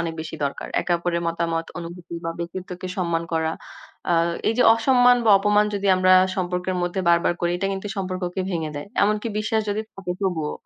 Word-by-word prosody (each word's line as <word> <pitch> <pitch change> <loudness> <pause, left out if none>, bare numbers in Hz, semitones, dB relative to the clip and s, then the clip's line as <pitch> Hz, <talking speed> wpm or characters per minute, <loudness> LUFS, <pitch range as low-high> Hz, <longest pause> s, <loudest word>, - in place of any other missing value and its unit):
অনেক 165 -1 -3
বেশি 160 0 -6
দরকার। 140 - -4
একে 175 - -1
অপরের 170 0 -1
মতামত, 165 0 -1
অনুভূতি 170 0 -8
বা 165 - -1
ব্যক্তিত্বকে 180 +1 -6
সম্মান 170 -2 0
করা। 160 0 0 0.6
আ - - +4 0.4
এই 225 - +1
যে 250 - +6
অসম্মান 245 +1 +5
বা 220 - +5
অপমান 210 +1 +3
যদি 200 0 -2
আমরা 185 0 +4 0.2
সম্পর্কের 180 0 -2
মধ্যে 175 +2 -1
বারবার 170 0 +3
করি, 175 - +1
এটা 195 - -2
কিন্তু 195 +1 -5
সম্পর্ককে 185 -1 -3
ভেঙে 160 -4 -2
দেয়। 145 - -6 0.2
এমনকি 210 +2 +1
বিশ্বাস 220 +1 0
যদি 210 +2 -1
থাকে 190 -2 -4
তবুও। 170 -6 -1
180 Hz, 185 wpm, -23 LUFS, 170-195 Hz, 0.6 s, যে